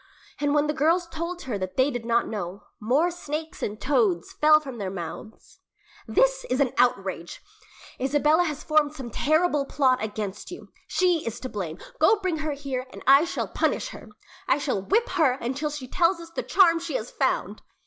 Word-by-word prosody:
And 290 0 +1
when 295 0 +3
the 300 - 0
girls 330 +5 +2
told 335 +2 -5
her 235 -6 -3
that 185 -1 -5
they 265 +2 +3
did 245 -3 -5
not 235 0 +2
know, 200 -2 -5 0.2
more 275 +11 +2
snakes 315 -2 -6
and 210 +1 -3
toads 225 -11 +1
fell 305 0 +5
from 265 -6 -8
their 195 -2 -3
mouths. 185 +4 -8 0.5
"This - - +2
is 255 - 0
an 270 -3 +2
outrage!" 195 -8 0
exclaimed 415 +1 -29
their 430 - -21 0.3
mother. - - +5
"Isabella - - +5
has 300 -3 -4
formed 305 -1 +2
some 260 -5 -7
terrible 310 +3 +2
plot 260 -4 +2
against 210 -2 -5
you. 360 - -10 0.2
She 360 -3 +2
is 230 0 -5
to 255 - -5
blame! 180 -7 -5 0.2
Go 440 - +5
bring 370 -5 -1
her 310 -1 -2
here, 270 -2 -4
and - - -11
I 275 +4 +7
shall 355 - -3
punish - - -1
her. - - -11 0.4
I 265 - +3
shall 270 -9 -1
whip 450 - +1
her 315 -8 +3
until 265 +4 -3
she 290 -3 -6
tells 340 +5 +2
us 335 0 -11
the - - -3
charm 335 -4 +4
she 340 - -5
has - - -3
found." - - -1
285 Hz, 200 wpm, -25 LUFS, 235-335 Hz, 0.5 s, I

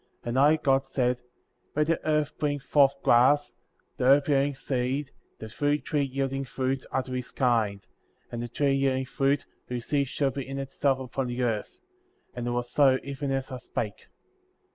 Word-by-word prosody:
^ - - -40 0.2
11. - - -10
And 125 +2 +1
I, 150 +3 +6
God, 135 -1 +3
said: 125 -2 0 0.5
Let 150 +1 +3
the 165 +1 0
earth 150 -1 +1
bring 145 -1 0
forth 140 0 +3
grass, 130 +5 +4 0.4
the - - -1
herb 140 +3 +5
yielding 140 0 +2
seed, 135 +2 -2 0.3
the 110 - -8
fruit 145 +6 -1
tree 150 -2 0
yielding 135 0 -1
fruit, 130 0 -2
after 130 -1 -2
his 125 -1 -4
kind, 110 -6 +1 0.5
and 120 - -4
the 120 - -3
tree 140 +3 +1
yielding 135 -1 +1
fruit, 135 +1 0 0.2
whose 120 -2 -4
seed 140 -2 +1
should 135 0 0
be 135 -1 -5
in 135 0 -5
itself 135 0 0
upon 130 0 -3
the 120 +1 -2
earth, 110 -3 -2 0.6
and 120 -1 -4
it - - 0
was 120 0 -1
so 135 -2 +5
even 140 +1 -4
as 135 0 -2
I 130 - -4
spake. 110 -4 -5
135 Hz, 185 wpm, -27 LUFS, 125-140 Hz, 0.6 s, I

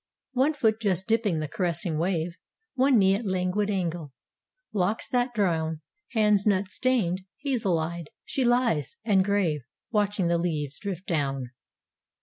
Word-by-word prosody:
One 265 +5 +3
foot 220 -5 +2
just 190 -3 0
dipping 220 -6 +1
the 155 - -2
caressing 170 0 -2
wave, 170 -1 0 0.4
One 265 -1 +4
knee 195 -2 +5
at 205 +5 -1
languid 190 +1 0
angle; 175 -7 -2 0.6
locks 205 +2 0
that 245 0 +1
drown 160 -6 0 0.3
Hands 210 -3 +4
nut 195 -1 +1
stained; 215 -9 +1 0.2
hazel 230 - +1
eyed, 165 0 -4 0.2
she 270 - -1
lies, 240 - +1
and 195 -4 +4
grave, 190 -7 +1 0.3
Watching 205 -3 +1
the 170 0 +2
leaves 150 -5 -2
drift 195 -3 -5
down. 135 -6 -1
190 Hz, 140 wpm, -27 LUFS, 170-220 Hz, 0.6 s, knee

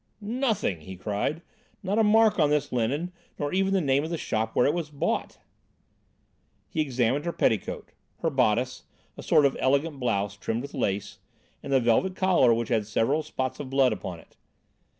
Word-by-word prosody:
"Nothing," 220 - -1
he 95 +4 -9
cried, 105 - -2 0.4
"not 200 +3 0
a - - +5
mark 215 -1 +4
on 150 -2 +4
this 145 -1 0
linen 135 +9 -1 0.3
nor 145 +2 -3
even 195 +1 +1
the 195 - +3
name 140 -3 +2
of 160 - -4
the 170 - -2
shop 110 -5 -2
where 125 - +4
it 145 - +3
was 165 -3 -3
bought." 145 -2 -2 1.3
He 160 - -1
examined 130 -1 0
her 170 - 0
petticoat, 110 - -1 0.3
her 165 - 0
bodice, 125 -1 +1 0.3
a - - -9
sort 145 - +4
of 135 - +2
elegant 140 +2 +1
blouse, 100 -5 -1
trimmed 115 +4 -3
with 140 - -8
lace, 100 +1 -2 0.4
and 140 - -7
the 135 - +5
velvet 125 +11 +2
collar 185 -10 +4
which 115 0 0
had 110 -3 0
several 125 +8 +1
spots 130 -4 -4
of 140 -3 -6
blood 135 -1 +3
upon 90 -3 -6
it. - - -21
140 Hz, 185 wpm, -26 LUFS, 115-165 Hz, 1.3 s, a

